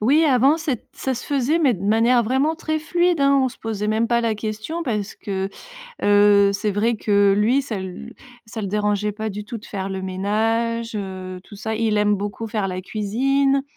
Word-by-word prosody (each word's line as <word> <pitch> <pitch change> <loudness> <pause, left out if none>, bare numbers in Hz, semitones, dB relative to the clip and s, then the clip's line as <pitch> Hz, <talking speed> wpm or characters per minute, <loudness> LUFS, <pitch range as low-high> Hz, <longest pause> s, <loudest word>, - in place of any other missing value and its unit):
oui, 285 +9 +4
avant 275 +2 +4
c'ét 300 -8 -4
ça 265 - -3
se 240 - -7
faisait 285 +3 +1
mais 275 -8 +3
de 190 +2 -7
manière 230 +3 +4
vraiment 265 +7 +1
très 315 -1 -2
fluide, 345 0 +1
hein, 275 0 +4
on 260 - +2
se - - -15
posait 215 -2 -3
même 220 +2 +1
pas 235 0 +2
la 225 -2 +1
question 215 +10 -4
parce 215 -7 -3
que, 195 -1 -3 0.5
heu, 205 -1 +5
c'est 205 +1 -1
vrai 225 +4 +1
que 200 -2 +3
lui, 240 +7 +3
ça 245 -5 -5
l 190 +6 -7 0.3
ça 220 0 -6
le 200 - -3
dérangeait 210 0 0
pas 220 +1 -4
du 210 +1 -6
tout 230 +2 -6
de 210 - -13
faire 195 -1 -4
le 190 0 -4
ménage, 225 +5 -1
heu, 185 -2 -5
tout 205 - -13
ça, 220 +2 -4
il 220 -1 +1
aime 210 0 +3
beaucoup 205 +3 -4
faire 210 -2 -2
la 185 0 -4
cuisine. 270 +8 +1
220 Hz, 210 wpm, -22 LUFS, 205-255 Hz, 0.5 s, heu